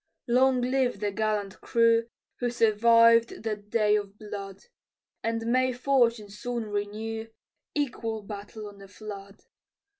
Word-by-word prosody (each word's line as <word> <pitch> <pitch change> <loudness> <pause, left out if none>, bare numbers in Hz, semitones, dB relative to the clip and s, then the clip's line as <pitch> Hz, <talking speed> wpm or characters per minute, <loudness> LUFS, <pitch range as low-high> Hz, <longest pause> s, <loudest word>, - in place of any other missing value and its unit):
Long 255 +1 +4
live 250 -3 0
the 205 0 -1
gallant 210 -2 -2
crew 230 0 +3 0.3
Who 245 - 0
survived 230 0 +4
that 210 -2 -4
day 210 -1 +3
of 200 -1 -6
blood: 200 -2 -8 0.6
And 230 0 -2
may 255 +2 +2
fortune 240 -5 +1
soon 235 +2 -4
renew 220 +2 -3 0.5
Equal 230 -7 -2
battle 210 +1 -8
on 200 -1 -12
the 195 - -12
flood. 200 -1 -10
225 Hz, 125 wpm, -27 LUFS, 205-235 Hz, 0.6 s, Long